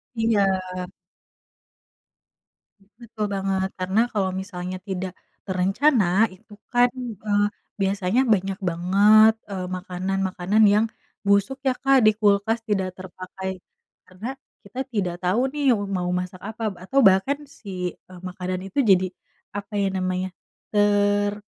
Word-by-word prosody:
Iya. 205 -4 +2 2.4
Betul 220 -2 -4
banget, 190 -1 -1
karena 190 +3 +1
kalau 195 -3 +1
misalnya 185 -1 -6
tidak, 185 -1 -3 0.3
terencana 195 +7 +2 0.3
itu 205 +3 -18 0.2
kan, 245 0 +4 0.3
eee, 205 -1 +3 0.4
biasanya 195 +4 +1
banyak 195 0 -1
banget, 200 +6 +5 0.2
eee, 190 -2 -4
makanan-makanan 190 +2 -1
yang 215 +2 +4 0.4
busuk 200 +6 +2
ya, - - +5
Kak, 270 -2 +4
di 215 - +7
kulkas 205 +2 +2
tidak 190 -3 +1
terpakai, 190 +1 -7 0.5
karena 210 +9 -7 0.3
kita 210 +6 -9
tidak 185 -5 -1
tahu 185 +5 +2
nih 285 -1 +2
wu 205 -4 0
mau 185 -2 -2
masak 180 0 -7
apa 220 +2 -6 0.2
atau 270 +8 +2
bahkan 195 +5 +4
si, 185 -8 -6 0.2
eee, 180 - -11
makanan 185 0 -4
itu 195 - -3
jadi 190 -4 +4 0.5
apa 205 +2 -6
ya 200 - +2
namanya, 185 0 -1 0.5
ter 205 0 +2
195 Hz, 125 wpm, -24 LUFS, 185-215 Hz, 2.4 s, di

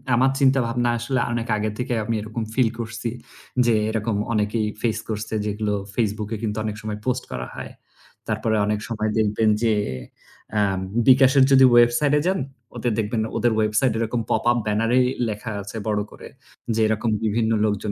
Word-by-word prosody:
আমার 130 +2 +4
চিন্তাভাবনা 125 -3 +2
আসলে 130 +3 -1
অনেক 115 0 -2
আগে 110 +1 -1
থেকেই 125 -2 -1
আমি 115 0 -1
এরকম 110 +2 -4
feel 125 -3 +3
করছি 115 +1 -4 0.6
যে, 120 - +3 0.2
এরকম 110 -1 -1 0.2
অনেকেই 105 +1 0 0.2
face 110 -2 0
করছে 110 +1 -4
যেগুলো 105 0 -1 0.2
Facebook 105 -2 -1
এ - - -5
কিন্তু 105 -1 -2
অনেক 105 - -3
সময় 105 -1 -5
post 125 0 0
করা 65 0 -4
হয়। - - -7 0.6
তারপরে 110 0 0
অনেক 105 0 0
সময় 110 -1 -1
দেখবেন 110 +1 +2
যে, 115 - +3 0.8
অ্যা 105 -1 +2 0.5
বিকাশের 135 +1 +6
যদি 130 -1 +7
website 120 +5 +3
এ - - -1
যান 190 -3 +1 0.4
ওদের 120 - -1
দেখবেন, 110 +1 -1 0.2
ওদের 120 -1 +2
website 110 +3 +2
এরকম 115 +1 -1
pop 110 - +1
up 120 - +1
banner 105 +2 +1
এ - - +5 0.3
লেখা 110 +2 -5
আছে 100 +3 -7
বড় 105 -1 +1
করে, - - -11 0.5
যে, 115 - +1
এরকম 110 +1 0
বিভিন্ন 110 +1 +1
লোকজন 105 0 -1
110 Hz, 175 wpm, -23 LUFS, 105-120 Hz, 0.8 s, যদি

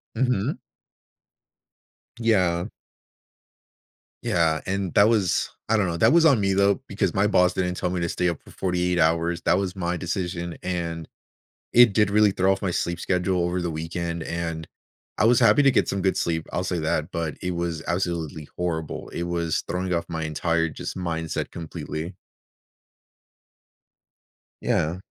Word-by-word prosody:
Mhm. 125 -6 0 1.6
Yeah. 90 -7 +2 1.6
Yeah. 80 -2 +2
And 95 -2 -2
that 105 +2 +6
was 100 -7 +1 0.2
I 110 - +4
don't 100 -3 +2
know. 85 - -2
That 115 - +4
was 170 -1 +6
on 140 -8 +5
me, 95 -1 +1
though, 100 0 +3
because 100 -3 -1
my 100 +2 +3
boss 90 -3 +3
didn't 90 -1 -1
tell 90 - -1
me 90 -1 -2
to 85 - -1
stay 90 -1 0
up 85 - -4
for - - -16
48 90 -1 0
hours. 85 +1 +2
That 90 - +3
was 95 -1 -2
my 90 -2 -2
decision, 90 -1 -3
and 85 -3 -3 0.7
it 120 -3 +7
did 105 -1 +3
really 105 0 +5
throw 95 +1 +2
off 95 - -3
my 95 - 0
sleep 85 0 -2
schedule 90 0 0
over 90 +1 -1
the 85 -1 -2
weekend. 85 +1 -4
And 85 -1 -4 0.5
I - - +3
was 120 +1 +5
happy 145 - +6
to 135 - +7
get - - +2
some 100 - -1
good 95 - +1
sleep, 80 -1 -1
I'll 90 - -1
say 90 -1 -1
that, 75 +1 -1
but 80 -3 -2
it 90 0 -1
was 85 -2 -3
absolutely 85 -4 -2
horrible. 80 -3 -3
It 85 - -3
was 85 -2 -1
throwing 90 +1 -2
off 85 0 0
my 80 -2 -3
entire 80 +1 0
just 75 - -6
mindset 80 -3 -3
completely. 80 +1 -6 2.5
Yeah. 80 +4 0
90 Hz, 165 wpm, -24 LUFS, 85-95 Hz, 2.5 s, it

